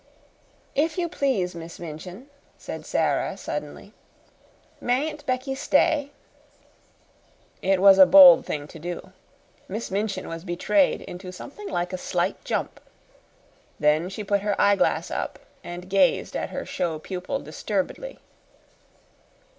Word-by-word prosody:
"If 310 +3 0
you 350 -1 0
please, 255 - -1
Miss 165 0 -9
Minchin," 175 - -8 0.3
said - - -8
Sara, - - 0
suddenly, - - -6 0.9
"mayn't 295 +5 -1
Becky 255 +1 -1
stay?" 285 +1 +2 1.5
It 190 0 +2
was 195 0 +7
a 190 - +10
bold 180 -1 +9
thing 145 -1 -4
to 160 - -11
do. 175 +3 -6 0.6
Miss 215 +3 -5
Minchin 200 -1 -2
was 165 0 -6
betrayed 195 - +1
into 180 +1 -8
something 340 - -9
like 175 +1 -2
a 185 - -3
slight - - -2
jump. - - -3 1.0
Then 155 +4 +2
she 205 +2 -6
put 200 0 +1
her 205 -1 -1
eyeglass 200 -1 +2
up, - - -3 0.3
and 175 +1 -8
gazed 195 +7 +2
at - - -2
her - - -5
show 165 -3 -2
pupil 180 +3 -4
disturbedly. 200 - -4
195 Hz, 125 wpm, -25 LUFS, 175-255 Hz, 1.5 s, a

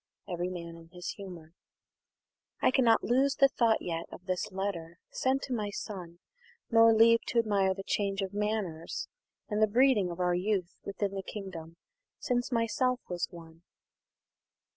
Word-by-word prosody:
Every 175 -1 -2
Man 170 -2 -7
in 165 0 -15
his 180 -1 -6
Humour. 175 -5 -10 1.1
"I - - +3
cannot 245 -4 +4
lose 270 +3 +2
the 275 - +6
thought 230 -4 +2
yet 165 -1 -3
of 180 - -11
this 185 +3 -2
letter, 180 -4 -4
Sent 265 +1 0
to 260 - -3
my 210 -3 -1
son; 180 -4 -7 0.5
nor 225 0 +7
leave 230 +1 +6
t' - - -2
admire 200 -4 +2
the 195 - -6
change 195 -1 -1
Of 190 0 -5
manners, 205 -6 -2 0.4
and 210 0 -1
the 215 - +6
breeding 230 -4 +4
of 170 +1 -7
our 180 -1 +2
youth 185 0 0
Within 200 0 -2
the 195 - -3
kingdom, 180 -5 -8 0.4
since 245 0 -1
myself 250 +2 +1
was 175 -1 -2
one." 165 -2 -13
195 Hz, 160 wpm, -30 LUFS, 175-225 Hz, 1.1 s, nor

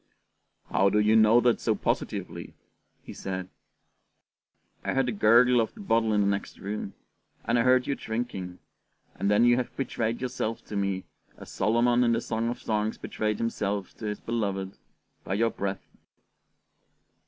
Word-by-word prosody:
"How 100 - +4
do 105 - +1
you 105 +1 +4
know 110 +1 +6
that 120 -1 +2
so - - +1
positively?" - - -3 0.5
he - - -9
said. 95 -1 -5 1.3
"I - - -2
heard 135 -1 +3
the 125 - -1
gurgle 120 +3 +5
of 110 - -3
the - - -14
bottle 115 - +1
in 105 -1 +3
the - - +2
next 100 0 -2
room, 100 0 -5 0.5
and 120 +2 +2
I - - +4
heard 125 +1 +4
you - - 0
drinking, 110 -8 -4 0.6
and 100 - -1
then 105 +3 +4
you 120 0 +5
have 125 - -4
betrayed 115 -3 -2
yourself 125 -3 -3
to 105 - -7
me, 100 -2 -1 0.3
as - - -11
Solomon 120 +4 +2
in 120 -1 +3
the 115 - +1
Song 115 0 -2
of 120 - -4
Songs 110 0 -1
betrayed 105 -1 -2
himself 105 -4 -2
to 110 - -7
his 105 0 -3
beloved, 100 -4 -3 0.5
by 95 - -2
your 115 +2 +2
breath." 95 -1 -4
110 Hz, 165 wpm, -27 LUFS, 100-120 Hz, 1.3 s, know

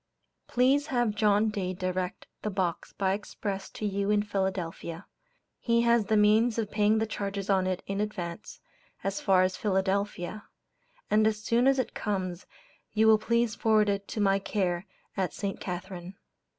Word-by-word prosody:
Please 270 +4 +3
have 240 -7 +1
John 210 +1 +3
Dade 185 -3 -3
direct 185 -1 -3 0.2
the 210 - -2
box 185 -4 -2
by 190 -1 0
express 200 -1 -4
to 215 - -6
you 200 0 -1
in 210 0 +3
Philadelphia; 190 -3 -3 0.5
he 235 -1 +2
has 235 -2 +3
the 215 - +3
means 215 +3 +4
of 220 -3 -2
paying 210 +1 +3
the 220 - +1
charges 200 -2 -3
on 190 -1 +2
it 185 -1 -2
in 195 +1 -2
advance, 210 -3 -5 0.4
as 195 0 -2
far 185 -1 +4
as 185 0 0
Philadelphia; 200 0 -1 0.7
and 215 +1 +5
as 215 -1 0
soon 235 +4 +3
as 270 0 +4
it 260 - -1
comes, 185 -4 -3 0.5
you 220 +1 +3
will 220 -1 +6
please 235 0 +1
forward 215 -1 +3
it 200 0 0
on 200 - -38
to 215 - -3
my 195 -1 +3
care 190 -2 -1 0.3
at 190 -2 -1
St. 200 -1 -3
Catherine. 180 0 -6
205 Hz, 170 wpm, -28 LUFS, 190-215 Hz, 0.7 s, will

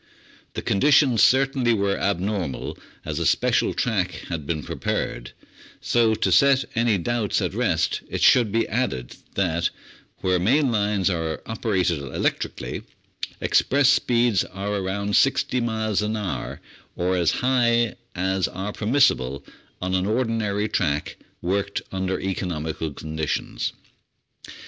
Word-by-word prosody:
The - - -4
conditions 130 +1 +4
certainly 130 -2 +4
were 100 -1 +1
abnormal, 95 -6 -2 0.3
as - - -3
a - - -1
special - - +2
track - - -1
had 80 -5 -4
been 75 -3 -2
prepared; 65 +2 -3 0.5
so 115 -2 +2
to - - 0
set 140 -1 +5
any 115 -3 +2
doubts 110 +2 0
at - - -2
rest - - 0
it - - -2
should 120 -5 +5
be 115 +2 +1
added 65 - -2 0.2
that, 85 -3 +1 0.5
where 90 -1 +2
main 130 - +3
lines 105 -3 +1
are 80 -3 -3
operated 95 -8 0
electrically, 70 -1 -3 0.6
express 140 -1 +3
speeds 120 -6 +3
are 100 +2 -5
around 100 +1 -1
60 130 -2 +2
miles 110 -3 0
an 105 +1 -1
hour, 90 - -4 0.3
or 90 +1 0
as 85 -3 +2
high 120 -3 +3 0.2
as 95 +1 0
are 100 +3 -5
permissible 105 - +1 0.4
on 95 0 -1
an 95 +1 +1
ordinary 110 -3 0
track 75 -8 -1 0.3
worked 100 +2 -1
under 95 0 -2
economical 80 -4 -3
conditions. 80 +1 -3
100 Hz, 125 wpm, -24 LUFS, 90-115 Hz, 0.6 s, set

